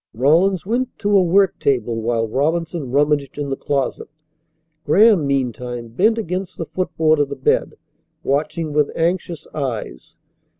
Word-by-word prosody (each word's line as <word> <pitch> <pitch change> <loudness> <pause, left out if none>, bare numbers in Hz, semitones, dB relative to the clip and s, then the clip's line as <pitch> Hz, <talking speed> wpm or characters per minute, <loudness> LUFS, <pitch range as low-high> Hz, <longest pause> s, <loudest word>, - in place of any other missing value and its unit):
Rawlins 165 - +2
went 245 +4 -2
to 205 -1 +1
a 195 - +6
work 190 +2 +2
table 120 -4 0
while 115 0 0
Robinson 160 +3 -1
rummaged 145 0 +1
in 145 -1 -3
the 135 - -1
closet. 135 -1 -2 0.8
Graham, 190 -1 +4
meantime, 125 -3 -2
bent 215 - +2
against 185 -3 -4
the 165 - -4
footboard 160 -3 0
of 145 -1 +1
the 140 - -5
bed, 135 - 0 0.5
watching 150 +2 -1
with 150 -1 +2
anxious 170 0 -1
eyes. 115 - -5
150 Hz, 140 wpm, -20 LUFS, 135-180 Hz, 0.8 s, a